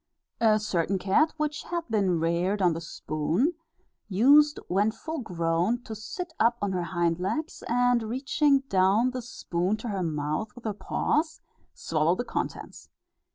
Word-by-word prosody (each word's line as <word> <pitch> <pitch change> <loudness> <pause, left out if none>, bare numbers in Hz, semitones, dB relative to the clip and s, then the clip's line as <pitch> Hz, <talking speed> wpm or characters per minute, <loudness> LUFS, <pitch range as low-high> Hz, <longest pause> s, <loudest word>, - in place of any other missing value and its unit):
A 220 -2 +4
certain 195 -2 0
cat 195 - +2
which 300 -1 -2
had 345 -1 -3
been 195 -6 +1
reared 170 +5 0
on 180 -3 +3
the 165 - -5
spoon, 165 - -1 0.6
used, 285 +9 +5
when 200 +4 +2
full 315 +9 -5
grown, 175 +3 -1
to 220 - -7
sit 320 - -6
up 235 +1 +3
on 205 -1 -1
her 180 -1 -1
hind 170 -1 0
legs, 300 - -3
and 245 0 +3
reaching 270 +5 +1
down 205 +1 +2
the 255 0 -4
spoon 190 -4 -2
to 230 +2 -6
her 195 -2 -2
mouth 155 +5 -2
with 245 - -12
her 215 - -2
paws, 305 +9 -1 0.4
swallow 160 +2 +1
the 245 - -3
contents. - - -5
210 Hz, 155 wpm, -27 LUFS, 175-250 Hz, 0.6 s, used